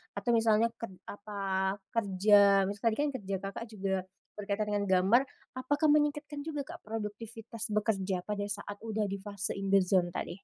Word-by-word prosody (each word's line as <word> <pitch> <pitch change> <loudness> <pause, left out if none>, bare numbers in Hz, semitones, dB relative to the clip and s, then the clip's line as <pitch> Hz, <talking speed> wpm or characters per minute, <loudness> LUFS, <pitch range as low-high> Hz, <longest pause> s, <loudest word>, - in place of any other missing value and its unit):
Atau 240 - 0
misalnya 225 0 +3
ked 230 - -4 0.2
apa 195 -2 -2 0.2
kerja 200 -2 +5
misal 200 +3 -2
tadi 220 - +2
kan 295 - 0
kerja 195 -1 -3
Kakak 200 +4 -5
juga 195 -3 -2 0.4
berkaitan 205 +1 -1
dengan 205 -1 0
gambar, 190 +7 +5 0.4
apakah 290 +4 +2
meningkatkan 295 0 +1
juga, 295 -2 -4
Kak, - - -9
produktivitas 225 +1 -5
bekerja 200 -3 0
pada 210 -1 -3
saat 205 0 -4
udah 220 -1 -1
di 200 - -3
fase 200 -1 -3
in 195 - -3
the 195 -1 +5
zone 180 -1 +3
tadi? 175 +2 -5
205 Hz, 165 wpm, -31 LUFS, 195-230 Hz, 0.4 s, kerja